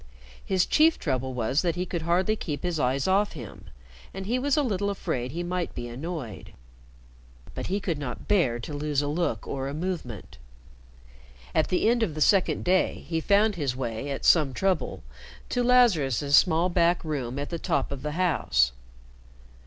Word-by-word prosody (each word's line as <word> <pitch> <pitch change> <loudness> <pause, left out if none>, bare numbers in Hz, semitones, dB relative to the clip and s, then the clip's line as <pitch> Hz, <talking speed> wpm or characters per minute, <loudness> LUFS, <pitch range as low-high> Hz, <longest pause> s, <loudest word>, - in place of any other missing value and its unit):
His 185 -2 +1
chief 320 +1 +4
trouble 130 -3 -2
was 125 +5 +1
that 170 -3 0
he 180 +1 -2
could 170 -2 -4
hardly 180 +6 +1
keep 150 -8 -5
his 175 -3 -1
eyes 130 +3 +1
off 200 +2 +2
him, - - -10 0.5
and 195 0 -5
he 240 +5 0
was 285 +3 +1
a 295 - +3
little 200 -5 -1
afraid 125 -10 -3
he 170 +4 -4
might 175 0 -3
be 120 0 -5
annoyed. 130 - -6 1.0
But - - -5
he 195 +2 -1
could 170 -6 -2
not 125 -4 -6
bear 165 - +2
to 150 - -7
lose 145 0 -1
a - - -2
look 150 -8 -2
or 135 -1 -3
a 140 - -4
movement. 140 - -5 1.1
At 155 - +2
the 185 - +1
end 235 +1 +3
of 180 -9 -1
the - - -4
second 195 +3 +3
day, 185 +1 +1
he 165 -1 -1
found 205 +4 +3
his 145 -8 -2
way, 125 +1 -4
at 140 - -4
some 145 -6 +4
trouble, 185 -8 -1 0.5
to 245 - 0
Lazarus's 160 - +4
small 170 +1 +4
back 175 -1 +2
room 135 -5 -3
at 145 +3 -4
the 170 - -3
top 140 -3 -1
of 140 -2 -5
the 150 +1 -4
house. 145 - +2
165 Hz, 185 wpm, -26 LUFS, 135-185 Hz, 1.1 s, chief